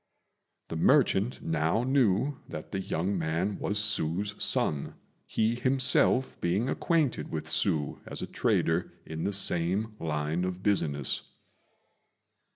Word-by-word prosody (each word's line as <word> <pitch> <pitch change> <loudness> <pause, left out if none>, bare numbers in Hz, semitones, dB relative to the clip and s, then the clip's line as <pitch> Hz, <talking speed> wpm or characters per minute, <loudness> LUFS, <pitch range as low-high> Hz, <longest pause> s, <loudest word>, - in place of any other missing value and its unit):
The - - -4
merchant 120 - +2
now 80 +7 0
knew 130 0 +2
that 75 - -8
the 95 - -2
young 95 +1 -2
man 85 +5 -1
was 105 - -1
Hsü's 100 -1 0
son, 70 -2 +1 0.3
he 110 +1 +1
himself 130 +1 +2
being 95 +8 0
acquainted 160 -6 0
with - - -4
Hsü 75 -2 +1
as - - -4
a - - -1
trader 80 +2 0
in 80 0 -5
the 100 - 0
same 100 +2 0
line 75 +2 -2
of 90 0 -4
business. 75 -9 +1
95 Hz, 125 wpm, -29 LUFS, 80-110 Hz, 0.3 s, merchant